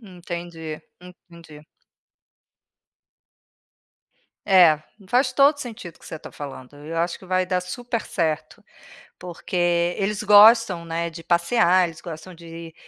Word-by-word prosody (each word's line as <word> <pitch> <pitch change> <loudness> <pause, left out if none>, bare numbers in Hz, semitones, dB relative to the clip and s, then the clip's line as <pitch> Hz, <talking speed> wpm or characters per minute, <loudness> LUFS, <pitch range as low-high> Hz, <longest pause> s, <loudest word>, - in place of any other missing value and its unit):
Entendi, 170 -5 -8 0.2
entendi. 170 -4 -15 2.8
É, 175 -6 +5 0.2
faz 255 +4 +1
todo 280 +3 +5
o 285 - -12
sentido 215 - -8
o - - -23
que - - -15
você - - -7
está - - -12
falando 140 -2 -9
e - - -10
eu 165 - -5
acho 170 +1 -1
que - - -17
vai 185 0 0
dar 180 0 0
super 235 +5 -5
certo. 160 -4 -3 0.6
Porque 180 +1 -9 0.4
eles 205 +1 -2
gostam, 210 -3 +6
né, 165 0 -3
de 165 0 -10
passear, 175 +1 +3
eles 165 -1 -12
gostam 170 +1 -9
de 165 -1 -11
175 Hz, 135 wpm, -23 LUFS, 165-195 Hz, 2.8 s, gostam